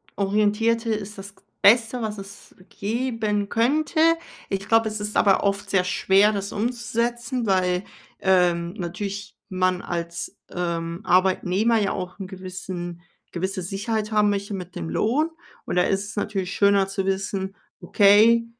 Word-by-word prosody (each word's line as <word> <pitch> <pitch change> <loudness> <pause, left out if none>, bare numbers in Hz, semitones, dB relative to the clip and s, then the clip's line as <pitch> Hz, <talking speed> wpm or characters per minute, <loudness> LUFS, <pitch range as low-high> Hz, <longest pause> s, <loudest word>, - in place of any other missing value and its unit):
orientierte 215 +3 +1
ist 210 -1 -5
das 195 0 -9
g - - -26 0.2
Beste, 230 +3 +5
was 215 -1 -3
es 195 0 -11
geben 215 -2 -2
könnte. 285 +9 +1 0.5
Ich 195 0 -3
glaube, 225 0 +4
es 215 0 -4
ist 210 0 -4
aber 195 -2 +4
oft 200 0 -1
sehr 195 -2 +3
schwer, 195 +3 +3
das 200 -1 -3
umzusetzen, 240 +2 -2
weil, 185 -2 +1 0.4
ähm, 175 -2 +2
natürlich 200 +2 -5
man 185 -1 0
als, 170 +2 -4
ähm, 170 0 -3
Arbeitnehmer 190 +4 +2
ja 205 -3 +1
auch 180 -2 -5
'n 195 - -5
gewissen 185 -2 -7 0.3
gewisse 190 +2 -3
Sicherheit 210 +4 -3
haben 210 -1 +3
möchte 200 +1 -3
mit 180 -1 -8
dem 80 -1 -4
Lohn. 255 - +1 0.4
Und - - -3
da 180 - +5
ist 195 +1 0
es - - -8
natürlich 195 -3 -2
schöner 200 -1 +3
zu 195 0 -3
wissen: 195 0 -2 0.2
„Okay, 220 +3 +5
200 Hz, 150 wpm, -24 LUFS, 185-215 Hz, 0.5 s, Beste